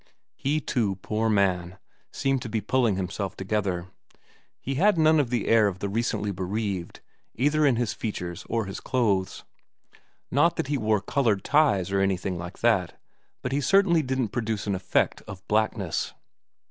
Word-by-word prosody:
He, 145 Hz, +3 st, 0 dB
too, 110 Hz, -9 st, -1 dB
poor 110 Hz, +1 st, 0 dB
man, 95 Hz, -3 st, +1 dB, 0.3 s
seemed 135 Hz, -1 st, 0 dB
to 120 Hz, -, -6 dB
be 110 Hz, -, -1 dB
pulling 120 Hz, -2 st, +1 dB
himself 95 Hz, +1 st, -4 dB
together. 95 Hz, -3 st, -1 dB, 0.7 s
He 135 Hz, -, -4 dB
had 185 Hz, +7 st, +3 dB
none 160 Hz, 0 st, +5 dB
of 135 Hz, -5 st, +1 dB
the 120 Hz, -3 st, -1 dB
air 110 Hz, -2 st, +5 dB
of 95 Hz, -2 st, -3 dB
the 100 Hz, +1 st, -3 dB
recently 105 Hz, -1 st, -1 dB
bereaved, 95 Hz, -1 st, -3 dB, 0.3 s
either 145 Hz, +4 st, +3 dB
in 130 Hz, -, +3 dB
his 115 Hz, -2 st, -1 dB
features 90 Hz, -6 st, -5 dB
or 115 Hz, -2 st, 0 dB
his 95 Hz, -, -6 dB
clothes. 100 Hz, -7 st, 0 dB, 0.9 s
Not 165 Hz, +5 st, +3 dB
that 160 Hz, -4 st, -3 dB
he 145 Hz, -, +1 dB
wore 110 Hz, -2 st, +1 dB
coloured 110 Hz, -4 st, +1 dB
ties 100 Hz, -, +3 dB
or 100 Hz, -, +2 dB
anything 95 Hz, -2 st, 0 dB
like 85 Hz, +2 st, -8 dB
that, 100 Hz, -7 st, +1 dB, 0.4 s
but 125 Hz, -, -2 dB
he 140 Hz, +2 st, 0 dB
certainly 170 Hz, +3 st, +4 dB
didn't 130 Hz, -4 st, -1 dB
produce 110 Hz, -3 st, -2 dB
an 100 Hz, -, -1 dB
effect 95 Hz, 0 st, 0 dB
of 95 Hz, -1 st, -10 dB
blackness. 105 Hz, -4 st, 0 dB
110 Hz, 165 wpm, -26 LUFS, 95-130 Hz, 0.9 s, none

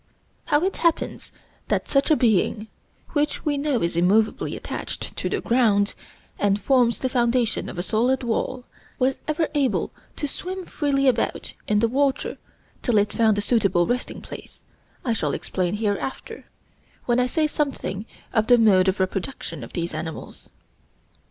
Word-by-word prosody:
How 295 Hz, +3 st, +2 dB
it 385 Hz, -, 0 dB
happens 335 Hz, -1 st, 0 dB, 0.4 s
that -, -, 0 dB
such 275 Hz, +2 st, +2 dB
a 310 Hz, -, +6 dB
being, 220 Hz, -3 st, +2 dB, 0.4 s
which 295 Hz, -1 st, -1 dB
we 295 Hz, -1 st, +1 dB
know 280 Hz, -, 0 dB
is 170 Hz, 0 st, 0 dB
immovably 200 Hz, +6 st, +2 dB
attached -, -, -5 dB
to -, -, -2 dB
the -, -, -1 dB
ground, 215 Hz, -5 st, +3 dB, 0.5 s
and 205 Hz, 0 st, +2 dB
forms 245 Hz, -1 st, +3 dB
the 260 Hz, -, -1 dB
foundation 240 Hz, -2 st, +1 dB
of -, -, -8 dB
a 175 Hz, -, -1 dB
solid 250 Hz, +6 st, +1 dB
wall, 245 Hz, +2 st, -2 dB, 0.3 s
was 260 Hz, +1 st, +1 dB
ever 310 Hz, +1 st, +1 dB
able 280 Hz, -4 st, +1 dB, 0.2 s
to 295 Hz, -, -3 dB
swim 370 Hz, +5 st, -5 dB
freely 275 Hz, -4 st, 0 dB
about 245 Hz, -3 st, 0 dB
in 210 Hz, 0 st, +2 dB
the 230 Hz, -, +4 dB
water 270 Hz, +3 st, 0 dB, 0.4 s
till 235 Hz, -3 st, +2 dB
it 205 Hz, 0 st, +2 dB
found 220 Hz, -2 st, +3 dB
a -, -, +1 dB
suitable 205 Hz, -6 st, +2 dB
resting 245 Hz, +4 st, -2 dB
place, -, -, -11 dB, 0.4 s
I 235 Hz, -, +2 dB
shall 150 Hz, -10 st, -1 dB
explain 185 Hz, +1 st, -2 dB
hereafter, 210 Hz, +4 st, -3 dB, 0.6 s
when 240 Hz, 0 st, +2 dB
I 250 Hz, -, +3 dB
say 310 Hz, +4 st, +1 dB
something 275 Hz, -9 st, -2 dB, 0.3 s
of 220 Hz, -2 st, +2 dB
the 245 Hz, -, +7 dB
mode 195 Hz, -5 st, +5 dB
of 190 Hz, +1 st, +1 dB
reproduction 185 Hz, -, -3 dB
of 115 Hz, -, -10 dB
these 170 Hz, -1 st, -2 dB
animals. 160 Hz, +1 st, -7 dB
235 Hz, 160 wpm, -24 LUFS, 205-275 Hz, 0.6 s, the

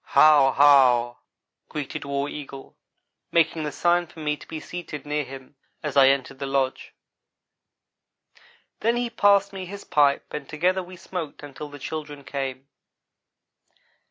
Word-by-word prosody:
"How 145 Hz, -3 st, +7 dB
how!" 130 Hz, -4 st, +5 dB, 0.5 s
greeted 150 Hz, 0 st, -5 dB
War 140 Hz, 0 st, -2 dB
Eagle, 140 Hz, -2 st, -9 dB, 0.6 s
making 165 Hz, -1 st, +2 dB
the 150 Hz, -, -3 dB
sign 175 Hz, +2 st, +1 dB
for 165 Hz, -, -15 dB
me 150 Hz, -1 st, -1 dB
to -, -, -15 dB
be 160 Hz, -, -6 dB
seated 155 Hz, -4 st, -7 dB
near 150 Hz, 0 st, -1 dB
him, 135 Hz, +1 st, -11 dB, 0.3 s
as 150 Hz, -2 st, -3 dB
I 135 Hz, -1 st, +7 dB
entered 135 Hz, -1 st, 0 dB
his 135 Hz, -, -3 dB
lodge. 135 Hz, -1 st, -1 dB, 1.8 s
Then 230 Hz, +2 st, +1 dB
he 240 Hz, -1 st, -2 dB
passed 200 Hz, -2 st, +3 dB
me 190 Hz, -1 st, -6 dB
his 200 Hz, +2 st, -8 dB
pipe 145 Hz, -2 st, +2 dB
and 150 Hz, -2 st, -6 dB
together 180 Hz, +5 st, +1 dB
we 180 Hz, 0 st, -11 dB
smoked 175 Hz, -5 st, -7 dB
until 145 Hz, +1 st, -8 dB
the 145 Hz, -, -10 dB
children 145 Hz, 0 st, -6 dB
came. 135 Hz, -1 st, -5 dB
150 Hz, 145 wpm, -24 LUFS, 140-170 Hz, 1.8 s, How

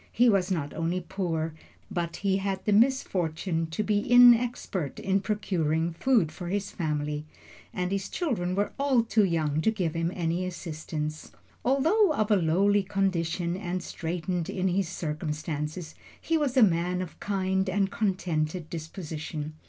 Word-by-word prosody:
He 245 Hz, +1 st, +4 dB
was 195 Hz, -3 st, +2 dB
not 155 Hz, -6 st, -2 dB
only 165 Hz, +2 st, -1 dB
poor, 170 Hz, -4 st, -2 dB, 0.4 s
but 170 Hz, -1 st, -2 dB
he 195 Hz, -1 st, +1 dB
had 195 Hz, -1 st, -3 dB
the 210 Hz, -, +3 dB
misfortune 185 Hz, -, +1 dB
to 160 Hz, +7 st, -2 dB
be 210 Hz, 0 st, +2 dB
inexpert 240 Hz, -, +4 dB
in 195 Hz, 0 st, +1 dB
procuring 170 Hz, -6 st, 0 dB
food 215 Hz, -4 st, +2 dB
for 175 Hz, +2 st, -7 dB
his 200 Hz, +2 st, -2 dB
family, 150 Hz, -3 st, -2 dB, 0.5 s
and 180 Hz, 0 st, -2 dB
his 195 Hz, -1 st, -2 dB
children 205 Hz, -, -1 dB
were 205 Hz, +1 st, 0 dB
all 270 Hz, -4 st, +3 dB
too 225 Hz, -1 st, +2 dB
young 155 Hz, -4 st, +1 dB
to 220 Hz, -, +3 dB
give 185 Hz, -8 st, -1 dB
him 165 Hz, +1 st, -1 dB
any 170 Hz, 0 st, -1 dB
assistance. 155 Hz, -3 st, -5 dB, 0.3 s
Although 315 Hz, -, +3 dB
of 215 Hz, -5 st, 0 dB
a -, -, +7 dB
lowly 195 Hz, +4 st, +3 dB
condition 180 Hz, -3 st, -1 dB
and 185 Hz, -2 st, -3 dB
straitened 175 Hz, +1 st, -3 dB
in 190 Hz, 0 st, 0 dB
his 185 Hz, -1 st, 0 dB
circumstances, 155 Hz, -1 st, -4 dB, 0.3 s
he 330 Hz, -, -1 dB
was 285 Hz, -4 st, 0 dB
a 250 Hz, -, +8 dB
man 180 Hz, -1 st, +2 dB
of 180 Hz, -, -11 dB
kind 190 Hz, -1 st, 0 dB
and 195 Hz, 0 st, +1 dB
contented 175 Hz, -5 st, -1 dB
disposition. 155 Hz, -2 st, -5 dB
180 Hz, 150 wpm, -28 LUFS, 165-205 Hz, 0.5 s, a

